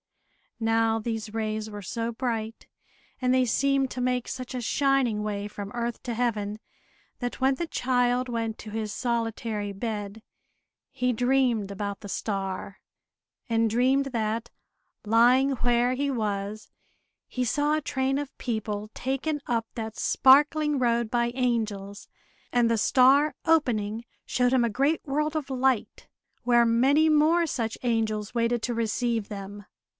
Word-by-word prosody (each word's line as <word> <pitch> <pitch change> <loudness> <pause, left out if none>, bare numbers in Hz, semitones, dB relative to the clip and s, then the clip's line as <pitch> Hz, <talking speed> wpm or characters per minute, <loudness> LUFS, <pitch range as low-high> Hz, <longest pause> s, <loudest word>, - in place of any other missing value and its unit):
Now, 225 0 +2
these 220 -1 -4
rays 215 -1 -2
were 205 -1 -7
so 230 +4 -3
bright, 225 -2 -4 0.5
and 250 0 +2
they 255 0 +3
seemed 275 +2 +1
to 250 - -4
make 250 -1 0
such 255 -1 -6
a 250 - -3
shining 260 -4 +1
way 205 -1 -3
from 205 -1 -7
earth 235 -1 -3
to 240 - -3
Heaven, 215 -3 -1 0.6
that 245 +1 -4
when 265 +1 +3
the 340 - -3
child 250 -2 +1
went 230 -2 -2
to 215 - -8
his 215 -1 -3
solitary 225 -3 -2
bed, 210 0 -5 0.7
he 250 -2 0
dreamed 245 -4 +1
about 200 0 -4
the 205 - -8
star; 195 -1 -4 0.7
and 230 -1 +2
dreamed 260 +4 +3
that, 230 -2 -2 0.5
lying 245 +5 +4
where 245 -1 +2
he 280 +2 -1
was, 210 -3 -3 0.6
he 250 - -2
saw 290 +5 +1
a - - -2
train 270 0 -1
of 290 -2 -6
people 215 -3 -3
taken 270 +4 -2
up 230 -2 0
that 220 -1 -6
sparkling 295 +2 +4
road 235 -2 +1
by 240 0 +1
angels. 215 -5 -2 0.4
And 240 -1 +3
the 230 - +2
star, 275 +6 +4
opening, 235 -9 +1 0.2
showed 250 0 +1
him 255 -2 +4
a 235 - +1
great 275 +8 +1
world 300 +2 -1
of 300 -3 -3
light, 260 -3 0 0.4
where 240 -1 +4
many 270 +7 +4
more 315 +3 +4
such 225 -6 -3
angels 220 -2 -1
waited 235 0 +1
to 240 - -1
receive 230 -1 -1
them. 200 0 -8
235 Hz, 145 wpm, -26 LUFS, 220-260 Hz, 0.7 s, lying